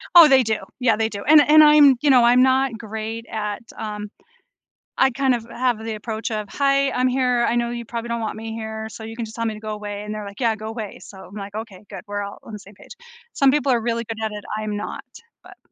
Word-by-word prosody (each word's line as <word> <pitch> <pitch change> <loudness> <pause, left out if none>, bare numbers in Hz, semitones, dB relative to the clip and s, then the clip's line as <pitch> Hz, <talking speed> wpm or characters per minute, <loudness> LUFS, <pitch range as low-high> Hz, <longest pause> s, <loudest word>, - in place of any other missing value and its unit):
Oh, 335 -3 +11
they 265 -2 +5
do, 220 -1 0 0.2
yeah, 230 -4 +3
they 220 +1 0
do, 200 -2 -7
and 300 +1 +7
and 305 +1 +7
I'm, 295 -3 +7
you 295 - +2
know, 250 -3 +6
I'm 245 +1 +5
not 260 -2 +2
great 220 +1 -6
at, 210 -1 -3 0.2
um 210 -1 -5 0.9
I 265 - +4
kind 265 0 +1
of 230 -1 -6
have 240 -3 -1
the 225 -1 -4
approach 220 +1 -5
of, 215 -1 -3
"Hi, 275 0 +2
I'm 255 0 +1
here, 250 -2 +1
I 235 - 0
know 235 0 0
you 240 0 -5
probably 235 0 -6
don't 235 0 -3
want 220 0 -4
me 225 0 -6
here, 220 0 -5
so 220 +1 -10
you 225 +1 -8
can 230 - -3
just 220 - -11
tell 230 0 -3
me 220 - -1
to 210 - -9
go 215 0 -6
away," 205 -1 -6
and 210 0 -6
they're, 210 - -5
like, 200 0 -10
"Yeah, 230 -3 +1
go 215 0 -8
away." 220 -2 -6
So, 195 - -13
I'm, 200 - -14
like, 200 0 -7
"Okay, 215 -3 -8
good," 195 -3 -8
we're 205 0 -3
all 200 0 -7
on 220 - -11
the 210 - -6
same 200 0 -16
page, - - -17 0.4
some 275 -1 +4
people 285 -2 +1
are 235 - +1
really 235 0 -2
good 225 0 -6
at 215 - -2
it, 210 -1 -8
I'm 215 -1 -3
not, 205 - -6 0.4
but, - - -15
225 Hz, 265 wpm, -22 LUFS, 215-250 Hz, 0.9 s, Oh